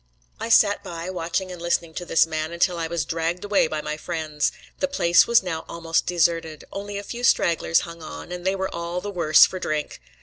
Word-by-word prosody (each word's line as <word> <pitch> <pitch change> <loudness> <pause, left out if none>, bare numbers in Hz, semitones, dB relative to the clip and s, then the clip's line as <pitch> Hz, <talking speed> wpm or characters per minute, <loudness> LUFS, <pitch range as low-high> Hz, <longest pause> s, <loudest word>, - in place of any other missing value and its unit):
I - - -4
sat 210 -2 +4
by, 170 +2 -6
watching 180 +1 -2
and 175 -2 -8
listening 170 -1 -1
to 175 - -5
this 165 - +4
man 155 0 -3
until 170 0 +1
I 165 - -1
was 170 -1 -2
dragged 165 +3 -2
away 200 -5 +3
by 155 -1 -3
my 150 - -3
friends. 155 -3 -2 0.3
The 280 - +1
place 175 -12 +4
was 235 -4 +4
now 165 -3 -3
almost 165 -1 -1
deserted; 165 -3 0
only 200 0 -5
a 200 - -5
few 240 +4 -7
stragglers 165 -7 +3
hung 170 -1 -9
on, 160 +2 -9
and 180 0 -6
they 190 +1 +1
were 190 0 -3
all 170 +1 -3
the, 205 +2 -5
worse 165 -5 +6
for 185 - -5
drink. 155 - -3
170 Hz, 215 wpm, -24 LUFS, 165-185 Hz, 0.3 s, worse